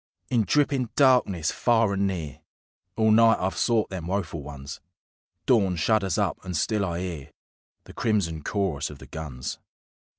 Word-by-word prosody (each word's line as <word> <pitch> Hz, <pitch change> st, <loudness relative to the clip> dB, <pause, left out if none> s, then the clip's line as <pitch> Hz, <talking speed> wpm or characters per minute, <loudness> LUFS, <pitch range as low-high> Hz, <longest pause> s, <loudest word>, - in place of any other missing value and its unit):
In 115 Hz, -4 st, +2 dB
drippin' 135 Hz, -3 st, +1 dB
darkness, 120 Hz, -, +3 dB
far 115 Hz, -4 st, +2 dB
and 100 Hz, 0 st, +1 dB
near, 80 Hz, -8 st, -5 dB, 0.6 s
All 110 Hz, 0 st, +4 dB
night 115 Hz, +1 st, +6 dB
I've 95 Hz, +1 st, -1 dB
sought 115 Hz, -4 st, +1 dB
them 90 Hz, -3 st, -5 dB
woeful 90 Hz, -4 st, -2 dB
ones. 70 Hz, 0 st, -9 dB, 0.6 s
Dawn 100 Hz, -7 st, +3 dB
shudders 95 Hz, +1 st, +1 dB
up -, -, -1 dB
and 90 Hz, -3 st, -3 dB
still 105 Hz, +5 st, 0 dB
I 85 Hz, -2 st, -2 dB
'ear 85 Hz, -7 st, -6 dB, 0.5 s
The -, -, -13 dB
crimson 95 Hz, -9 st, -1 dB
chorus 90 Hz, -8 st, -1 dB
of 75 Hz, -, -10 dB
the -, -, -12 dB
guns. 75 Hz, -6 st, -6 dB
95 Hz, 155 wpm, -26 LUFS, 80-110 Hz, 0.6 s, night